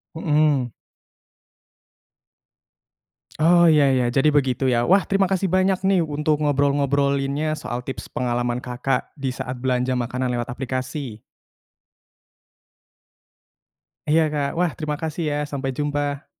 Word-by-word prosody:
Mhm. 150 -6 +1 2.7
Oh 170 +2 +5
ya 150 -4 +5
ya 125 -2 +2
jadi 135 +5 +2
begitu 135 -2 +1
ya, 120 0 +1
wah 195 +2 +5
terima 195 -1 +1
kasih 190 -1 -1
banyak 185 0 +2
nih 190 -1 +3
untuk 150 -1 0
ngobrol-ngobrolinnya 140 0 +1
soal 125 -3 -5
tips 130 - -7
pengalaman 120 0 -2
Kakak 125 +2 -2
di 135 - -3
saat 125 0 -5
belanja 125 0 0
makanan 125 0 -1
lewat 120 -1 -2
aplikasi. 130 -1 -5 2.9
Iya 160 +2 +4
Kak, 145 -1 0
wah 175 -1 +2
terima 150 -2 -3
kasih 160 +1 -3
ya, - - -1
sampai 135 -1 -3
jumpa. 145 -1 -2
140 Hz, 115 wpm, -22 LUFS, 130-155 Hz, 2.9 s, Oh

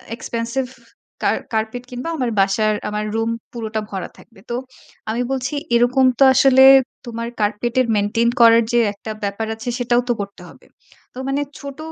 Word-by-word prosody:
expensive 235 +3 -3 0.5
কার - - +2 0.2
carpet 220 +2 -2
কিনব। 250 -1 -7
আমার 250 -4 -1
বাসার 200 +2 +2 0.2
আমার 210 0 -3
রুম 225 0 0 0.2
পুরোটা 220 -2 -4
ভরা 190 -2 -5
থাকবে। 225 - -18
তো - - -1 0.5
আমি 230 +3 -1
বলছি 260 0 -2 0.2
এরকম 245 +3 +3
তো - - +7
আসলে 265 0 +6 0.4
তোমার 230 -1 -5
carpet 210 +3 -1
এর 255 - 0
maintain 210 +3 +1
করার 230 0 +7
যে, 240 - +4
একটা 220 +2 -8
ব্যাপার 200 +2 -2
আছে 225 +2 -6
সেটাও 245 0 +2
তো - - +4
করতে 200 0 -8
হবে। - - -18 0.5
তো - - -14
মানে 275 +1 0 0.2
ছোট 280 -1 -8
230 Hz, 165 wpm, -20 LUFS, 220-250 Hz, 0.5 s, তো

